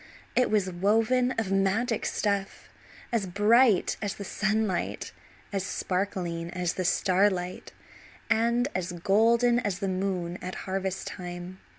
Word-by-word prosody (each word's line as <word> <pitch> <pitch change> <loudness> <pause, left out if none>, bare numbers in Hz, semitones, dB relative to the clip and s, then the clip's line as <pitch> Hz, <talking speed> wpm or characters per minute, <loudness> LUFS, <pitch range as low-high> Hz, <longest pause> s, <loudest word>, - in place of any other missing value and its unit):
It 250 - +3
was 210 -3 +2
woven 220 +7 +2
of 220 -4 -2
magic 205 +4 +1
stuff 200 -2 -2 0.4
as 225 -5 0
bright 210 +3 +4
as 205 -2 -2
the 200 - -7
sunlight, 210 -1 -1 0.4
as 195 -2 0
sparkling 180 -4 -2
as 180 -1 -2
the 185 - -3
starlight, 185 0 +1 0.6
and 235 +2 +2
as 180 -1 -3
golden 230 +7 +3
as 205 -6 -2
the 195 0 -2
moon 185 -2 -2
at 185 - -5
harvest 190 0 -2
time. 180 +1 -7
195 Hz, 125 wpm, -28 LUFS, 185-220 Hz, 0.6 s, bright